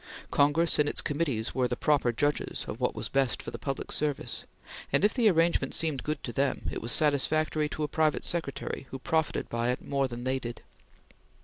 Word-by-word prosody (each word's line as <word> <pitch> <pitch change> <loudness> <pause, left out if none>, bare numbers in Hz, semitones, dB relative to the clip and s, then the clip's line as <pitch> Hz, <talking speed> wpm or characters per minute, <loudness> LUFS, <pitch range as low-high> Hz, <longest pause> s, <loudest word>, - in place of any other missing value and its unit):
Congress 145 +4 +3
and 145 0 +4
its - - 0
committees 140 -7 -1
were 130 -1 +2
the 125 - -2
proper 145 -3 +2
judges 145 +5 -1
of - - -5
what - - 0
was - - -3
best 135 -3 +1
for - - -6
the - - -7
public 135 -1 -3
service, 145 -2 -1 0.5
and - - +4
if 215 - +3
the 235 -4 +4
arrangement 170 -1 +2
seemed 155 -5 -1
good 150 +1 -3
to 120 - -5
them, 135 +2 0
it - - -4
was 115 - -1
satisfactory 150 +1 +2
to 155 - -3
a - - +1
private 155 0 +1
secretary 140 -4 -3
who 135 - -5
profited 160 +4 0
by 115 +1 -1
it 125 - -2
more 140 -1 +1
than 120 -1 -7
they 130 +1 0
did. 120 -1 -7
145 Hz, 205 wpm, -29 LUFS, 130-155 Hz, 0.5 s, and